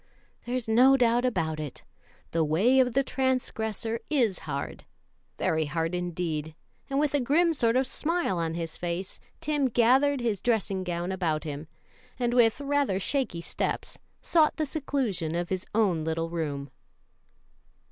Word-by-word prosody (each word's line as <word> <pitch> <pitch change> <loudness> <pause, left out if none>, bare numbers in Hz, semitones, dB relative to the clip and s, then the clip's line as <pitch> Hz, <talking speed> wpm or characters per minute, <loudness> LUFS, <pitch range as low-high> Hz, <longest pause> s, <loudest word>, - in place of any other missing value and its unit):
There's 250 -1 -2
no 255 +5 +6
doubt 240 0 +3
about 160 -10 -1
it, 150 -3 -6 0.5
'the 165 -1 +2
way 195 - +3
of 250 -2 +3
the 275 +2 +3
transgressor 230 -4 -1
is 240 - +2
hard' 140 0 -4 0.5
very 160 -1 +1
hard 165 +3 -2
indeed 170 -3 -3 0.3
and 275 0 0
with 295 -1 +1
a 290 - +3
grim 325 +7 +3
sort 235 -5 +2
of 260 +1 +3
smile 325 - 0
on 165 -1 -1
his 165 -2 -4
face, 175 +2 -4 0.2
Ted 285 -5 0
gathered 265 +4 +4
his 225 -6 -1
dressing 200 -5 0
gown 175 0 -3
about 165 -5 -1
him, 150 0 -6 0.5
and 240 -2 0
with 235 0 +4
rather 280 -8 +1
shaky 245 -6 -1
steps - - -3 0.2
sought 315 -3 +3
the 310 - 0
seclusion 260 - -2
of 175 0 -2
his 185 0 -3
own 190 -8 +2
little 165 +1 -2
room. 145 -5 -3
220 Hz, 150 wpm, -28 LUFS, 165-260 Hz, 0.5 s, no